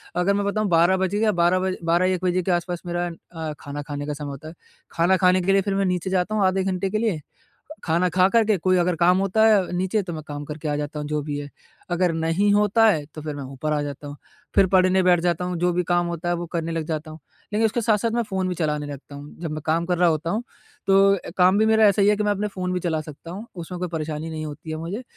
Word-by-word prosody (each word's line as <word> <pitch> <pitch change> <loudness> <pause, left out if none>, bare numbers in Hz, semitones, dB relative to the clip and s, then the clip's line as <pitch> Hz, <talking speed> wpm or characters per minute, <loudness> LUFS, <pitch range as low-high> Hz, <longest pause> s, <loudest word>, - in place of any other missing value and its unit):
अगर 180 +3 +2
मैं 200 0 0
बताऊँ 215 +1 0
12 175 +2 +4
बज 190 +1 -1
गया 215 0 +2
12 175 0 +2
बजे 185 0 -1
12-1 180 +2 +2
बजे 180 0 +2
के 185 - 0
आस-पास 175 0 -1
मेरा 175 0 -2 0.2
अ, 160 -2 -5
खाना 145 +1 -6
खाने 145 -1 -5
का 150 - -2
समय 145 0 -6
होता 140 +3 -9
है। 160 - -9 0.4
खाना 175 +3 +2
खाने 185 0 +4
के 190 +2 +1
लिए 195 - +4
फिर 195 0 -2
मैं 195 0 +1
नीचे 180 0 -1
जाता 190 +3 0
हूँ 205 -3 +2
आधे 185 0 +1
घंटे 190 0 -1
के 215 - -1
लिए 215 -9 -1 0.6
खाना 170 +2 +1
खाकर 190 +6 +4
के 215 -2 +2
कोई 185 +1 +2
अगर 175 0 +1
काम 180 +2 +4
होता 195 +3 +2
है 200 -5 +3
नीचे 190 +3 0
तो 175 - -6
मैं 155 - -5
काम 145 0 -5
करके 150 +1 -6
आ 145 - 0
जाता 150 +1 -4
हूँ 150 - -4
जो 150 0 -1
भी 145 -1 -4
है। 145 0 -7 0.4
अगर 175 0 +2
नहीं 165 +6 +1
होता 210 +2 +4
है 155 -8 +2
तो 155 - -6
फिर 150 -1 -5
मैं 140 - -6
ऊपर 150 +3 -2
आ 150 - 0
जाता 145 0 -6
हूँ, 145 - -7 0.4
फिर 190 - +5
पढ़ने 185 0 +4
बैठ 180 -1 +4
जाता 175 0 0
हूँ 180 -1 -3
जो 180 0 +2
भी 180 0 0
काम 175 0 +1
होता 170 0 -3
है 175 - +1
वो 175 0 -4
करने 165 -1 -2
लग 165 -1 -2
जाता 155 -1 -4
हूँ। 155 - -11 0.3
लेकिन 220 +2 +2
उसके 230 +2 0
साथ-साथ 220 +1 +1
मैं 235 0 0
फ़ोन 190 -3 -2
भी 180 - -2
चलाने 150 -3 -1
लगता 145 0 -9
हूँ। 145 +1 -10
जब 165 -3 -4
मैं 155 -1 -4
काम 165 +2 +1
कर 180 0 0
रहा 175 -1 +5
होता 160 +1 -1
हूँ 225 +3 -1 0.4
तो 195 0 +5
अ, 180 - -8
काम 185 +2 +5
भी 220 - +4
मेरा 220 0 +5
ऐसा 200 0 +3
ही 195 - +4
है 210 - +4
कि 210 - 0
मैं 205 - +2
अपने 205 +1 -1
फ़ोन 185 -2 -4
भी 180 - -1
चला 160 -3 -1
सकता 155 +2 -10
हूँ 205 +5 -7
उसमें 175 +1 -7
कोई 180 - -2
परेशानी 155 -1 -4
नहीं 155 -1 -5
होती 155 +2 -8
है 155 - -3
मुझे 180 +9 -5
180 Hz, 280 wpm, -23 LUFS, 155-195 Hz, 0.6 s, फिर